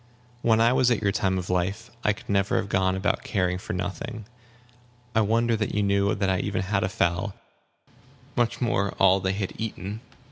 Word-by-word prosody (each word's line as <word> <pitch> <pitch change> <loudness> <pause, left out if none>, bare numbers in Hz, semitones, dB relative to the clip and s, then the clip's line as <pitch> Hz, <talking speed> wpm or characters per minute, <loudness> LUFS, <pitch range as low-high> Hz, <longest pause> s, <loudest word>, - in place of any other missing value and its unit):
When 110 -1 +3
I 115 +2 +5
was 130 -1 +4
at 115 -3 +1
your 100 - +3
time 95 -2 0
of 90 0 -3
life, 95 +6 -1
I 105 - +4
could 105 - -8
never 100 -1 +1
have 100 - 0
gone 95 -1 +2
about 95 +2 0
caring 90 -3 0
for - - -5
nothing. 100 +3 -4 0.9
I 110 - +4
wonder 115 +2 +2
that 110 -2 -2
you 105 - +2
knew 100 0 +2
that 100 -1 0
I 95 -1 +1
even 100 -1 -1
had 100 +1 0
a 95 - 0
fowl; 95 +1 0 1.0
much 120 -2 +1
more 100 -5 0
how 95 -1 +6
much 95 - -6
they 95 - +2
had 100 -1 -3
eaten!" 105 -1 -4
100 Hz, 205 wpm, -26 LUFS, 95-110 Hz, 1.0 s, how